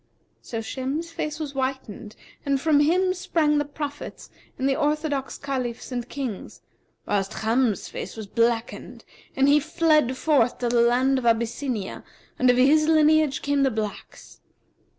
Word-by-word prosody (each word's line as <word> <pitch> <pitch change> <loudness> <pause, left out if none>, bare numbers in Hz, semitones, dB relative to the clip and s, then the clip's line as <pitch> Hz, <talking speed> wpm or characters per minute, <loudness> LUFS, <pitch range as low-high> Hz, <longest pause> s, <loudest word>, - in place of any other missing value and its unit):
So 225 -1 -5
Shem's 275 +8 -4
face 305 -2 -4
was 300 -3 -4
whitened 260 -5 -4 0.3
and 275 -1 0
from 300 0 +3
him 365 +5 +3
sprang 325 -5 +1
the 290 - -1
prophets 290 0 -7 0.3
and 265 - 0
the 270 - +2
orthodox 295 -2 -1
Caliphs 255 -4 -4
and 245 0 -4
Kings; 255 -9 -6 0.4
whilst 200 +1 -2
Cham's 225 -1 +1
face - - -7
was 220 - -6
blackened 230 +2 -2 0.3
and 270 +1 +3
he 290 +1 +6
fled 305 -4 +2
forth 275 -7 +2
to 245 -1 -1
the 235 0 +3
land 255 +3 +3
of 240 - -2
Abyssinia, 230 -1 -1 0.4
and 255 - +4
of 245 - +4
his 300 +4 +4
lineage 310 -2 +3
came 285 0 +1
the 270 - +4
blacks. 215 -3 -6
270 Hz, 150 wpm, -24 LUFS, 240-300 Hz, 0.4 s, he